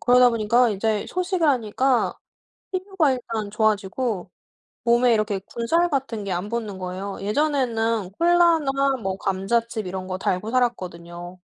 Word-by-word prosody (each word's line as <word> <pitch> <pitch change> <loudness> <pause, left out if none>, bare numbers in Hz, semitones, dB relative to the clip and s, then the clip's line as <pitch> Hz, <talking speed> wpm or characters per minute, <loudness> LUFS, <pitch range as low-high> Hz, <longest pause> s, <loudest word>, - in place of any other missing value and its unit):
그러다 250 0 +6
보니까 230 +2 +3
이제 210 +1 -1
소식을 365 -3 0
하니까 255 0 +1 0.5
피부가 370 -6 +1
일단 230 -4 -4
좋아지고 210 -1 -1 0.5
몸에 240 +1 +4
이렇게 215 -2 0
군살 330 +10 +1
같은 260 -7 -2
게 195 - -3
안 180 +3 -2
붙는 215 -4 -4
거예요. 185 +2 -5
예전에는 230 -4 0
콜라나 320 -6 +3
뭐 190 -1 -2
감자칩 220 +3 -1
이런 185 0 -5
거 185 0 -3
달고 190 +3 -1
살았거든요. 175 -7 -3
230 Hz, 310 characters per minute, -23 LUFS, 195-265 Hz, 0.5 s, 그러다